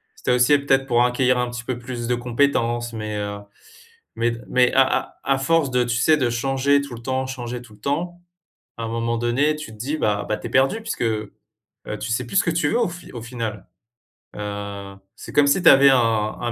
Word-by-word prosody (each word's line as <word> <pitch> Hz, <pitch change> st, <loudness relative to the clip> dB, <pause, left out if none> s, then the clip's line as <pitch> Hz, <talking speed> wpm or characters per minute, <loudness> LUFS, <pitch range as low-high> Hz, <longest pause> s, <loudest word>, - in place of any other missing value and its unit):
c'était 125 Hz, -, -2 dB
aussi 125 Hz, +4 st, +5 dB
peut-être 135 Hz, -1 st, +1 dB
pour 120 Hz, -1 st, +3 dB
acquérir 125 Hz, 0 st, +2 dB
un 125 Hz, 0 st, 0 dB
petit 120 Hz, 0 st, -6 dB
peu 125 Hz, -1 st, -3 dB
plus 120 Hz, -1 st, -6 dB
de 125 Hz, -, +1 dB
compétences, 120 Hz, -1 st, 0 dB
mais 110 Hz, -2 st, -5 dB
heu, 105 Hz, 0 st, -4 dB, 0.8 s
mais 120 Hz, +1 st, +1 dB
d 115 Hz, -, -6 dB
mais 125 Hz, -1 st, +3 dB
à 135 Hz, -, +6 dB
à 130 Hz, -, +3 dB, 0.3 s
à 135 Hz, -, +2 dB
à -, -, -3 dB
force, 150 Hz, +1 st, +2 dB
tu 125 Hz, -1 st, +1 dB
sais, 120 Hz, +6 st, +3 dB
de 130 Hz, -4 st, +1 dB
changer 135 Hz, +3 st, +1 dB
tout 140 Hz, -4 st, -7 dB
le 115 Hz, -, -10 dB
temps, 130 Hz, +2 st, -2 dB
changer 125 Hz, -2 st, -5 dB
tout 110 Hz, -3 st, -16 dB
le 105 Hz, -, -18 dB
temps, 175 Hz, +8 st, -3 dB, 0.6 s
à 115 Hz, -, -4 dB
un -, -, -3 dB
moment 115 Hz, +1 st, -1 dB
donné 135 Hz, +6 st, +1 dB
tu 150 Hz, -7 st, -8 dB
te 110 Hz, -, -13 dB
dis, 140 Hz, +7 st, -2 dB
bah 105 Hz, -7 st, 0 dB
bah 110 Hz, -, 0 dB
tu -, -, -8 dB
es -, -, -6 dB
perdu 135 Hz, +12 st, +2 dB
puisque, 225 Hz, -, -4 dB
heu, 110 Hz, -2 st, -2 dB, 0.7 s
tu 115 Hz, -, -4 dB
sais 125 Hz, +1 st, -1 dB
plus 195 Hz, -, -2 dB
ce -, -, +5 dB
que 170 Hz, -, 0 dB
tu 160 Hz, -3 st, +1 dB
veux 235 Hz, -, +1 dB
au 235 Hz, -, +2 dB
fi 180 Hz, +1 st, -11 dB
au 120 Hz, -, -6 dB
final. 115 Hz, -4 st, -5 dB, 0.7 s
Heu, 100 Hz, -1 st, -6 dB, 0.2 s
c'est -, -, -10 dB
comme 145 Hz, -1 st, +4 dB
si 145 Hz, +6 st, +3 dB
tu -, -, +8 dB
avais 135 Hz, 0 st, +7 dB
un 135 Hz, -, +5 dB
un 110 Hz, -3 st, 0 dB
un 120 Hz, -1 st, -1 dB
125 Hz, 240 wpm, -22 LUFS, 115-140 Hz, 0.8 s, tu